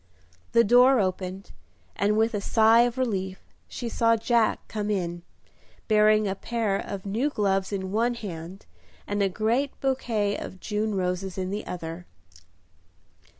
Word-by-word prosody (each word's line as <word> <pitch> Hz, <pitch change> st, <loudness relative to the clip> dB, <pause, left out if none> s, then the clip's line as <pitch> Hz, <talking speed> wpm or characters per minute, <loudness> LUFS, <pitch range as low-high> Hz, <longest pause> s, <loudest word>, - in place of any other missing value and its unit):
The 230 Hz, -, +6 dB
door 245 Hz, +4 st, +6 dB
opened, 185 Hz, 0 st, -3 dB, 0.4 s
and 210 Hz, +1 st, +1 dB
with 225 Hz, +2 st, +2 dB
a 205 Hz, -, -1 dB
sigh 225 Hz, +2 st, +5 dB
of 240 Hz, +1 st, -6 dB
relief 190 Hz, -7 st, -2 dB, 0.3 s
she 240 Hz, -, -6 dB
saw 230 Hz, 0 st, +2 dB
Jack 230 Hz, 0 st, +1 dB
come 210 Hz, -1 st, -3 dB
in, 175 Hz, -4 st, -2 dB, 0.7 s
bearing 215 Hz, -1 st, +4 dB
a 190 Hz, -, 0 dB
pair 220 Hz, 0 st, -2 dB
of 195 Hz, 0 st, -5 dB
new 225 Hz, +9 st, 0 dB
gloves 195 Hz, -6 st, 0 dB
in 190 Hz, -2 st, -3 dB
one 235 Hz, +3 st, +1 dB
hand 185 Hz, -4 st, -8 dB, 0.4 s
and 205 Hz, 0 st, -2 dB
a 195 Hz, -, +2 dB
great 230 Hz, +8 st, -1 dB
bouquet 230 Hz, -6 st, 0 dB
of 190 Hz, -, -8 dB
June 210 Hz, 0 st, -2 dB
roses 185 Hz, 0 st, -2 dB
in 185 Hz, 0 st, -3 dB
the 205 Hz, +2 st, -4 dB
other. 170 Hz, 0 st, -6 dB
210 Hz, 150 wpm, -26 LUFS, 190-230 Hz, 0.7 s, The